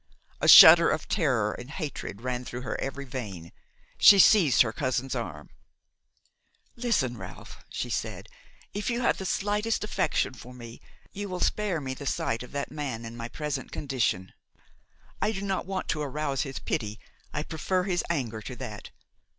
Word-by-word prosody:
A - - 0
shudder 165 +1 +10
of 155 - -2
terror 130 - +1
and 125 +2 -9
hatred 145 - -6
ran 125 0 -3
through 120 0 -6
her 125 - -4
every 140 +1 -4
vein. 100 -11 -7 0.5
She 200 - +9
seized 185 -9 +6
her 110 -2 -4
cousin's 130 0 -2
arm. 85 - -6 1.2
"Listen, 220 - 0
Ralph," 95 -1 -11
she - - -4
said; - - -4 0.5
"if 205 +2 -3
you 240 0 -1
have - - +1
the 190 - -4
slightest 210 +4 0
affection 210 -9 0
for 125 +1 -12
me, 120 -1 -11 0.3
you 205 0 -6
will 180 -1 -4
spare 205 -5 0
me 135 -2 -4
the 140 +2 -7
sight 115 - -1
of 125 - -9
that 140 0 -4
man 135 -6 -5
in 115 +1 -8
my 115 0 -6
present 145 -3 -4
condition. 120 -10 -2 0.9
I 215 - +2
do 195 -1 -5
not 190 -2 -2
want 190 -1 -3
to 155 - -1
arouse 145 -1 -2
his 135 -1 -4
pity, 105 0 -3 0.3
I 150 - -3
prefer 180 +4 -1
his 180 -2 -1
anger 120 -9 -2
to 125 - -7
that. 115 -5 -8
135 Hz, 170 wpm, -27 LUFS, 120-180 Hz, 1.2 s, shudder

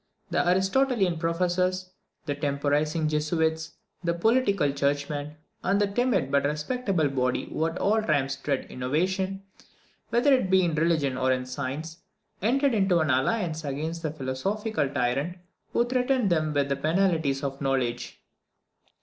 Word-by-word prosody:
The - - +2
Aristotelian 190 -1 +2
professors, 180 +2 0 0.3
the 145 - -1
temporising 145 +2 0
Jesuits, 160 +1 0 0.3
the 170 -1 0
political 200 - +2
churchmen, 145 +1 -2 0.3
and 195 +2 +2
that 200 -1 0
timid 245 - +1
but 140 0 +3
respectable 160 - 0
body 125 -2 0
who 160 - -1
at 165 +2 -5
all 215 +2 +2
times 140 -8 0
dread 140 -3 -2
innovation, 185 +9 -1 0.7
whether 245 +5 +4
it 255 -8 +2
be 190 0 +4
in 170 -2 +1
religion 155 -5 +1
or 130 0 +2
in 130 0 0
science, 140 +5 -5 0.4
entered 270 +6 +2
into 195 -4 +3
an 155 -3 +2
alliance 160 - 0
against 155 +4 -3
the 160 - -2
philosophical 155 - -2
tyrant 140 +7 -1 0.3
who 235 - +2
threatened 250 -3 +1
them 155 -2 +1
with 140 -1 0
the 140 - +1
penalties 155 -2 +1
of 135 0 -4
knowledge. 130 -3 -2
160 Hz, 140 wpm, -27 LUFS, 140-190 Hz, 0.7 s, whether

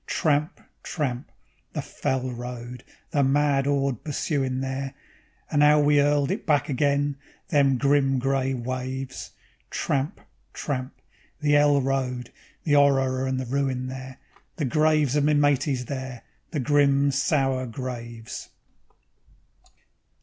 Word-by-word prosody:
Tramp, 150 0 0 0.2
tramp, 135 -5 -3 0.4
the - - -2
fell 130 -1 -2
road, 125 0 -7 0.3
the 145 - +2
mad 140 0 +2
'orde 140 -4 0
pursuin' 135 -3 -1
there, 135 +1 -3 0.6
And 145 - +3
'ow 150 0 +6
we 145 0 +4
'urled 145 -1 +2
it - - -4
back 150 -2 +2
again, 140 +1 +1 0.3
them 140 -5 +3
grim, 140 0 +3
grey 135 0 0
waves; 130 +1 -5 0.4
Tramp, 140 +2 -1 0.3
tramp, 130 -3 -4 0.4
the 145 -1 +3
'ell 145 -1 +5
road, 125 -2 -2 0.3
the 145 -3 +2
'orror 135 -2 +3
and 130 0 -1
the 130 - -3
ruin 130 0 -1
there, 130 0 -8 0.4
The 155 - -1
graves 150 0 +2
of 145 - +3
me 150 +1 +3
mateys 140 -3 +2
there, 130 -2 -6 0.3
the 155 - -3
grim, 140 0 +3
sour 135 -2 +1
graves. 120 -2 -7
135 Hz, 125 wpm, -25 LUFS, 130-145 Hz, 0.6 s, ow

